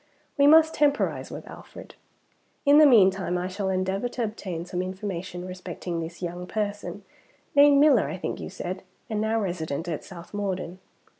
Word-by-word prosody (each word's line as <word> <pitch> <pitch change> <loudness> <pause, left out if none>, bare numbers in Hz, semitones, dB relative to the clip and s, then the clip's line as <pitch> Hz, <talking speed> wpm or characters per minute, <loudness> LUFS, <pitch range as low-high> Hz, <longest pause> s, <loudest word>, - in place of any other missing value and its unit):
We 280 -1 +5
must 320 +1 +6
temporise 290 -1 +1
with - - -8
Alfred. - - -12 0.7
In 285 +1 +7
the 305 - +8
meantime 190 -7 +4
I 180 +1 -2
shall 190 +1 -3
endeavor 190 +5 -1
to 240 - -3
obtain 190 -6 -5
some 180 0 -3
information 185 -1 -5
respecting 180 -2 -5
this 170 +2 -7
young 175 +1 -5
person 205 0 -4 0.5
named 285 0 +6
Miller, 285 -8 +5
I - - -4
think - - -4
you - - -6
said, 185 0 -5 0.3
and 215 -1 0
now 220 +1 +1
resident 165 -5 -3
at 160 -4 -4
South 175 0 -11
Morden. 190 -3 -3
190 Hz, 165 wpm, -26 LUFS, 180-220 Hz, 0.7 s, the